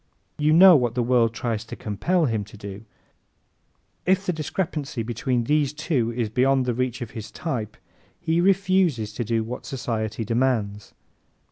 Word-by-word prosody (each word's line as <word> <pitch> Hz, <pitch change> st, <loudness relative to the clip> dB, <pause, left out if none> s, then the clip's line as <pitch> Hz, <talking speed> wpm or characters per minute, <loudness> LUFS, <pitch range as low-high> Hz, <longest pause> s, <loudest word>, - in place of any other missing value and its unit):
You 150 Hz, +1 st, +3 dB
know 180 Hz, +3 st, +9 dB
what 120 Hz, -5 st, +1 dB
the 125 Hz, -, +1 dB
world 120 Hz, -2 st, +3 dB
tries 115 Hz, -1 st, -3 dB
to -, -, -8 dB
compel 165 Hz, -, 0 dB
him 110 Hz, -5 st, -1 dB
to 105 Hz, +1 st, -14 dB
do. 100 Hz, +1 st, -9 dB, 1.2 s
If 190 Hz, +1 st, +2 dB
the 180 Hz, -, 0 dB
discrepancy 155 Hz, -5 st, -3 dB
between 120 Hz, +2 st, -1 dB
these 145 Hz, +1 st, +1 dB
two 150 Hz, -7 st, -1 dB
is 120 Hz, -1 st, -1 dB
beyond 130 Hz, +4 st, +2 dB
the 125 Hz, -, 0 dB
reach 125 Hz, 0 st, -2 dB
of 115 Hz, -, -9 dB
his 110 Hz, -2 st, -7 dB
type 115 Hz, -10 st, -4 dB, 0.4 s
he 170 Hz, 0 st, +1 dB
refuses 185 Hz, -, +2 dB
to 120 Hz, -, -3 dB
do 115 Hz, 0 st, 0 dB
what 120 Hz, +3 st, -7 dB
society 115 Hz, -4 st, -3 dB
demands. 115 Hz, -4 st, -1 dB
125 Hz, 160 wpm, -24 LUFS, 115-155 Hz, 1.2 s, know